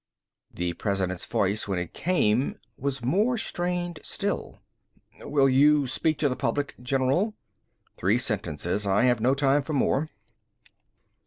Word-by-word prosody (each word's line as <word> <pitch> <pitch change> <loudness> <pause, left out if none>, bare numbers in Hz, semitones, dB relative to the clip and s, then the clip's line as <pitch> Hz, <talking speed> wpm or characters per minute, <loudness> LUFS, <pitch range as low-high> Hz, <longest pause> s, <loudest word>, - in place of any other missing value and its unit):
The 90 0 -2
President's 95 -1 -2
voice, 100 +2 0
when 95 -2 -1
it 90 -2 -4
came, 130 -9 +1 0.2
was 135 -2 -3
more 210 - +2
strained 175 -5 -2
still. - - -3 0.6
"Will 140 -1 +2
you 145 +2 +5
speak 145 +4 0
to 150 - +2
the 130 - -1
public, 140 +2 -1
General?" 135 - +1 0.6
"Three 100 +6 +2
sentences. 100 - -2
I 100 +3 +3
have 125 -2 +3
no 130 +4 +3
time 140 +1 +3
for 155 +3 -5
more." 145 +2 +1
130 Hz, 135 wpm, -26 LUFS, 105-150 Hz, 0.6 s, you